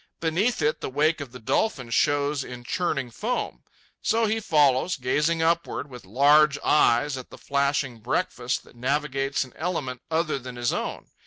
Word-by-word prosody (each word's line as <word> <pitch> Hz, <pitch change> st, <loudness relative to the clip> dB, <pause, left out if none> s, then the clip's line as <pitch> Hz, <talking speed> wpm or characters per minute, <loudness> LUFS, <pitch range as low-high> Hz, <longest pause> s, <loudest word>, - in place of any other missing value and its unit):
Beneath 170 Hz, +5 st, 0 dB
it, 150 Hz, +1 st, +1 dB
the -, -, -3 dB
wake 150 Hz, +3 st, +1 dB
of 135 Hz, -4 st, -7 dB
the 125 Hz, -, -9 dB
dolphin 125 Hz, -, -1 dB
shows 145 Hz, +5 st, +1 dB
in 125 Hz, -1 st, -9 dB
churning 135 Hz, -3 st, -2 dB
foam. 240 Hz, -, -3 dB, 0.4 s
So 225 Hz, 0 st, +2 dB
he 220 Hz, +1 st, 0 dB
follows, 150 Hz, -3 st, +3 dB
gazing 150 Hz, +6 st, +1 dB
upward 165 Hz, -3 st, 0 dB
with 125 Hz, -4 st, -10 dB
large 140 Hz, +6 st, +5 dB
eyes 145 Hz, -1 st, +3 dB
at 125 Hz, -, -11 dB
the -, -, -12 dB
flashing 140 Hz, -3 st, -1 dB
breakfast 105 Hz, -, -1 dB
that -, -, -19 dB
navigates 135 Hz, +2 st, -1 dB
an 130 Hz, -, -14 dB
element 145 Hz, -7 st, -3 dB
other 160 Hz, -3 st, 0 dB
than 125 Hz, -1 st, -8 dB
his 120 Hz, -1 st, 0 dB
own. -, -, -4 dB
145 Hz, 165 wpm, -25 LUFS, 130-160 Hz, 0.4 s, large